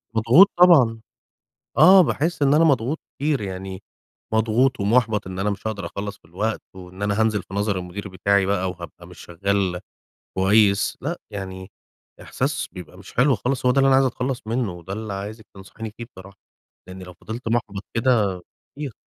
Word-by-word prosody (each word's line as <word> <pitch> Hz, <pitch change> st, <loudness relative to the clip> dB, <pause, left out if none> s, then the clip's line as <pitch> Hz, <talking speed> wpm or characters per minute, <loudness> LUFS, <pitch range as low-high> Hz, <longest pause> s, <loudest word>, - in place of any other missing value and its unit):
مضغوط 125 Hz, -, +6 dB
طبعًا، 140 Hz, -11 st, +5 dB, 0.8 s
آه 185 Hz, +6 st, +8 dB
باحس 165 Hz, 0 st, -1 dB
إن 140 Hz, 0 st, +4 dB
أنا 160 Hz, +2 st, +5 dB
مضغوط 140 Hz, 0 st, +1 dB, 0.2 s
كتير 145 Hz, -2 st, 0 dB
يعني، 95 Hz, 0 st, -6 dB, 0.5 s
مضغوط 115 Hz, +3 st, +2 dB
ومُحبَط 110 Hz, 0 st, +1 dB
إن 95 Hz, 0 st, -7 dB
أنا 100 Hz, +2 st, 0 dB
مش 100 Hz, -, -6 dB
هاقدَر 100 Hz, -5 st, -3 dB
أخلّص 100 Hz, +3 st, -6 dB
في -, -, -55 dB
الوقت، 100 Hz, +7 st, -3 dB
وإن 95 Hz, +1 st, -11 dB
أنا 105 Hz, +1 st, 0 dB
هانزِل 110 Hz, -3 st, +1 dB
في 95 Hz, -, -12 dB
نظَر 100 Hz, -1 st, 0 dB
المدير 90 Hz, +3 st, -7 dB
بتاعي 95 Hz, +1 st, +1 dB
بقى 95 Hz, -2 st, 0 dB
وهابقى 85 Hz, -1 st, -11 dB
مش 90 Hz, -, -14 dB
شغّال 95 Hz, 0 st, -2 dB, 0.6 s
كويس. 100 Hz, +1 st, +3 dB
لأ، 165 Hz, +6 st, -3 dB
يعني 95 Hz, -1 st, -7 dB, 0.5 s
إحساس -, -, -2 dB
بيبقى 90 Hz, -2 st, -11 dB
مش 95 Hz, 0 st, -13 dB
حلو 130 Hz, +2 st, +3 dB
خالص، 125 Hz, +4 st, -2 dB
هو 125 Hz, -, +5 dB
ده 135 Hz, -, +2 dB
اللي 135 Hz, -, +4 dB
أنا 135 Hz, -, +5 dB
عايز 135 Hz, 0 st, +4 dB
أتخلّص 125 Hz, 0 st, -2 dB
منُّه، 115 Hz, -3 st, -1 dB
وده 90 Hz, +2 st, -8 dB
اللي 110 Hz, -1 st, -5 dB
عايزِك 105 Hz, +3 st, -7 dB
تنصحيني 105 Hz, +3 st, -9 dB
فيه 115 Hz, -, -7 dB
بصراحة. 95 Hz, +1 st, -13 dB, 0.5 s
لأني 95 Hz, 0 st, -9 dB
لو 90 Hz, 0 st, -11 dB
فضِلت 110 Hz, +7 st, -8 dB
مُحبَط 110 Hz, -4 st, -2 dB
كده 110 Hz, -6 st, +1 dB, 0.3 s
كتير 140 Hz, -5 st, -6 dB
105 Hz, 175 wpm, -22 LUFS, 95-125 Hz, 0.8 s, آه